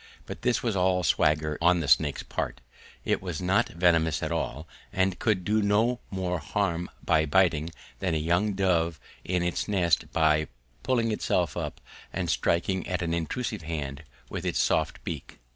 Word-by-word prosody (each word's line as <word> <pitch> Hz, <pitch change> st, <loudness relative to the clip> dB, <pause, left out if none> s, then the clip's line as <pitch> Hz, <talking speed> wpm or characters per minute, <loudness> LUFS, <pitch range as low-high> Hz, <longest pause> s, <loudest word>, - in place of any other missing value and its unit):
But -, -, -8 dB
this 120 Hz, -2 st, +1 dB
was 115 Hz, -4 st, 0 dB
all 90 Hz, -1 st, +2 dB
swagger 75 Hz, -2 st, +2 dB
on 85 Hz, +1 st, +4 dB
the 80 Hz, -, -2 dB
snake's -, -, +3 dB
part: -, -, -4 dB, 0.5 s
it -, -, +1 dB
was 90 Hz, -5 st, -4 dB
not 95 Hz, +2 st, +2 dB
venomous 85 Hz, -2 st, +2 dB
at 80 Hz, -, -2 dB
all, 80 Hz, -2 st, -3 dB, 0.2 s
and 95 Hz, -2 st, 0 dB
could 100 Hz, -6 st, +1 dB
do 110 Hz, +2 st, +2 dB
no 110 Hz, +4 st, +2 dB
more 90 Hz, -2 st, -2 dB
harm 90 Hz, +1 st, -1 dB, 0.2 s
by 80 Hz, 0 st, +3 dB
biting 80 Hz, -1 st, +3 dB, 0.3 s
than 90 Hz, -4 st, 0 dB
a -, -, +2 dB
young 85 Hz, +7 st, +1 dB
dove 85 Hz, -5 st, +1 dB, 0.2 s
in 90 Hz, -1 st, 0 dB
its 90 Hz, 0 st, -1 dB
nest 90 Hz, -5 st, +1 dB
by 80 Hz, -1 st, +3 dB, 0.3 s
puffing 115 Hz, -3 st, +1 dB
itself 90 Hz, -6 st, 0 dB
up -, -, -4 dB, 0.3 s
and -, -, -1 dB
striking 95 Hz, +2 st, 0 dB
at 90 Hz, -1 st, -1 dB
an 85 Hz, -1 st, -1 dB
intrusive 85 Hz, +7 st, -2 dB
hand 75 Hz, -3 st, -5 dB, 0.2 s
with -, -, -5 dB
its -, -, -1 dB
soft -, -, +1 dB
beak. -, -, -6 dB
90 Hz, 170 wpm, -27 LUFS, 80-95 Hz, 0.5 s, on